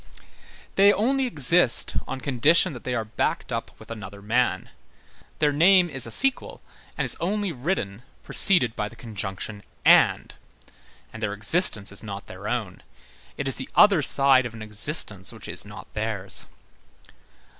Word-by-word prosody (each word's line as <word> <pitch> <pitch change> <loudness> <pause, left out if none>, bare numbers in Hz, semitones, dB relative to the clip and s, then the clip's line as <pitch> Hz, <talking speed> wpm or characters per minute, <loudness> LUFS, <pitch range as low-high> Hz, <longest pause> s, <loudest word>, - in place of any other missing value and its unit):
They 200 +1 +6
only 260 +6 0
exist 155 - +4
on 130 0 -6
condition 150 +7 +2
that 125 - -12
they 125 - -3
are 115 -2 -3
backed 110 - -3
up - - -4
with - - -14
another 100 -3 -9
man; 120 +5 -2 0.7
their 150 -1 +1
name 175 +3 +3
is 130 -4 +4
a - - -7
sequel, 270 - +2 0.4
and - - -1
is - - -2
only 200 +2 -2
written 125 - -4 0.2
preceded 130 - +2
by 105 0 -4
the 115 - -16
conjunction 105 -2 -7 0.2
and; - - +3 0.8
and 115 - -10
their 105 -2 -3
existence 105 - +3
is 100 - -2
not 100 -2 -8
their 95 +3 -10
own; 110 -6 -5 0.6
it 140 - -4
is 135 - -2
the 130 - -7
other 200 -6 +5
side 135 -2 +4
of 115 - -13
an 110 - -9
existence 105 - 0
which - - -11
is - - -6
not - - -13
theirs. 105 -3 -4
125 Hz, 155 wpm, -23 LUFS, 105-165 Hz, 0.8 s, They